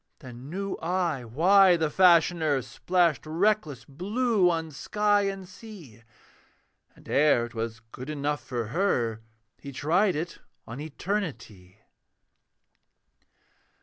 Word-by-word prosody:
Then 130 -1 -11
knew 195 +3 -4
I 170 -6 -2
why 180 - +5
the 160 -2 -1
Fashioner 170 -6 +3
Splashed 165 +4 0
reckless 160 - 0
blue 200 - +1
on 165 -2 -2
sky 205 +6 +1
and 195 -1 -5
sea; 185 - -13 0.9
And - - -19
ere 140 -5 +3
'twas 115 -1 -5
good 130 +3 -9
enough 145 -3 -2
for 120 -3 -4
her, 120 - 0 0.4
He 140 - -9
tried 175 +8 +1
it 165 +3 -5 0.3
on 115 +4 -8
Eternity. 150 - -5
160 Hz, 110 wpm, -27 LUFS, 130-190 Hz, 0.9 s, why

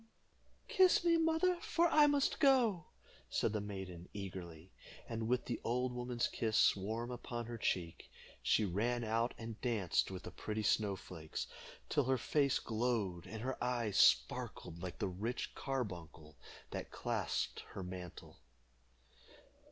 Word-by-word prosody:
"Kiss 370 -2 +5
me, 340 -1 +5
mother, 325 +2 +2
for 345 0 +3
I 300 -1 +7
must 285 -1 +2
go," 245 - +4 0.4
said - - +1
the 105 - 0
maiden, 95 -4 -7
eagerly. 90 -3 -7 0.4
And 115 -1 -3
with 125 +1 +1
the 120 - -3
old 125 +1 0
woman's 125 -1 -1
kiss 110 -2 +3
warm 110 +5 -3
upon 120 -1 -5
her 120 0 -6
cheek, 85 -5 -2 0.3
she 110 - +3
ran 115 +6 0
out 115 +2 0
and 115 -1 -7
danced 110 -8 +1
with 95 -1 -6
the - - -7
pretty 110 0 -3
snow 105 -1 +2
flakes 80 -4 -6 0.4
till 145 - +2
her 130 +1 +2
face 140 +2 +2
glowed 110 -6 -1
and 110 0 -6
her 130 +1 -2
eyes 120 -5 0
sparkled 80 +7 +3
like 90 -1 -5
the - - -1
rich 105 +7 -3
carbuncle 85 - -5 0.4
that - - -4
clasped - - -2
her 95 - -5
mantle. 90 -1 -8
115 Hz, 145 wpm, -36 LUFS, 95-125 Hz, 0.4 s, I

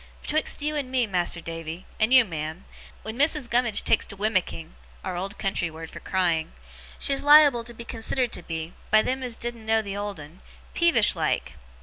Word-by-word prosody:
Betwixt 305 -1 -1
you 300 +1 0
and 280 -4 -2
me, 255 -2 +2
Mas'r 175 -4 -1
Davy 165 +1 -6
and 220 +3 +2
you, 255 -2 +7
ma'am 160 -1 -6 0.4
wen 220 +3 -7
Mrs. 295 -3 +1
Gummidge 235 -3 +2
takes - - +3
to - - -8
wimicking,' 185 -5 -1 0.3
our 185 - -4
old 195 +3 -4
country 190 -4 -1
word 160 0 -9
for - - -9
crying, 170 -4 0 0.4
'she's 275 -1 +2
liable 290 -5 +7
to 240 +1 -6
be 235 - -7
considered 235 +2 -2
to - - -4
be, 165 0 -6 0.2
by 215 0 +5
them 260 +1 -2
as 250 -3 -3
didn't 235 -1 -6
know 220 0 +1
the 200 -1 -5
old 205 -3 -4
'un, 150 +5 -12 0.3
peevish 340 -1 +4
like. - - -1
215 Hz, 195 wpm, -25 LUFS, 175-250 Hz, 0.4 s, you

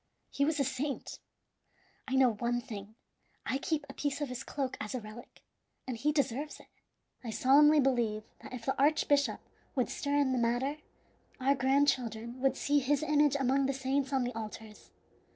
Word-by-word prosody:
He 280 - +1
was 305 0 0
a - - +3
saint! 270 +1 -3 0.9
I 265 - -1
know 260 -3 +5
one 240 +3 -1
thing 215 -4 -8 0.5
I 265 - -1
keep 300 0 -1
a 275 - -9
piece 285 0 -2
of 290 -3 -2
his 250 +1 -5
cloak 270 -3 -3
as 210 +4 -4
a - - -1
relic, 215 +2 -12 0.4
and 255 - -3
he 285 +7 +1
deserves 285 0 -1
it. - - -15 0.6
I 235 - -5
solemnly 295 +6 +5
believe 240 -6 +1 0.2
that - - -10
if 245 -2 -7
the 270 - 0
archbishop 285 -1 +3 0.4
would 255 -3 +1
stir 285 0 -1
in 280 -2 +3
the 255 - +1
matter, 245 +5 0 0.6
our 265 +2 +3
grandchildren 255 -3 +1
would 270 0 +2
see 290 0 +2
his 285 +2 +1
image 295 -2 +3
among 270 +1 +2
the 275 - 0
saints 270 +1 -1
on 265 -2 +2
the 245 +1 -3
altars. 215 -1 -8
265 Hz, 180 wpm, -31 LUFS, 240-285 Hz, 0.9 s, know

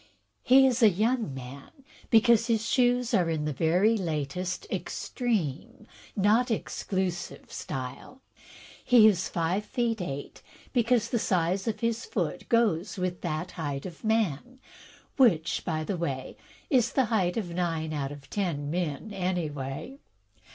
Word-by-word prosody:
He 265 +1 +6
is 255 -1 +2
a 220 - +8
young 220 - 0
man 130 +2 -9 0.4
because 230 0 +5
his 225 -1 +1
shoes 245 -1 +2
are 175 -3 +3
in 155 -2 -1
the 150 - -1
very 180 - +3
latest, 175 0 -3
extreme, 225 - -3 0.3
not 215 +5 +3
exclusive 185 -5 -3
style. 135 - -6 0.6
He 245 -4 +6
is 185 -4 +2
five 175 +4 0
feet 230 -2 -1
eight, 140 -5 -6 0.3
because 235 -2 +2
the 235 - +1
size 185 +1 0
of 225 - -2
his 230 +1 0
foot 175 - -3
goes 210 -5 +2
with 180 -1 -2
that 170 +1 -3
height 145 -4 -4
of 175 -3 -9
man, 220 - 0 0.6
which, 180 - +3
by 155 -2 -2
the 185 +3 -3
way, 135 -6 -4 0.4
is 245 -4 +3
the 265 - +3
height 180 -3 +1
of 180 -6 -3
nine 165 -3 -1
out 140 -2 -2
of 145 -1 -10
ten 155 -8 -2
men, 175 +4 -3
any 180 -4 -1
way. 140 - -6
185 Hz, 145 wpm, -28 LUFS, 160-230 Hz, 0.6 s, a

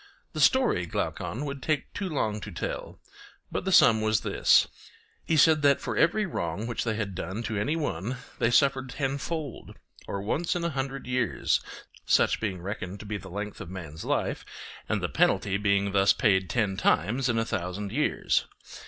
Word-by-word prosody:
The - - -2
story, 250 - +3
Glaucon, 120 - -3
would 140 -1 -5
take 155 +1 -1
too 200 -2 -3
long 110 -9 -1
to 105 - -7
tell; 85 - -5 0.5
but - - -3
the 190 - 0
sum 110 -10 +6
was 110 0 +2
this:—He 160 - 0
said 155 0 +5
that 140 -1 +4
for - - -4
every 210 +6 +3
wrong 95 - -3
which 120 0 -2
they 110 -2 -1
had 105 -3 -3
done 95 +5 -4
to 110 -1 -3
any 145 +10 0
one 125 - -2 0.2
they 115 - +3
suffered 130 +1 +3
tenfold; 140 +2 -4 0.3
or 100 0 -4
once 165 - -1
in 175 - -2
a 170 - 0
hundred 135 -1 -4
years—such 125 -1 0
being 95 -5 -3
reckoned 100 -1 -5
to - - -10
be 105 0 -3
the 95 - -10
length 105 +2 -5
of - - -7
man's 80 -4 -7
life, - - -1 0.5
and - - 0
the - - +1
penalty 100 -1 +2
being 100 0 +1
thus 100 0 +4
paid 95 -6 +2
ten 105 -4 0
times 120 +7 +2
in 115 - +1
a 115 - +1
thousand 95 +1 -3
years. - - +1
110 Hz, 180 wpm, -27 LUFS, 100-140 Hz, 0.5 s, sum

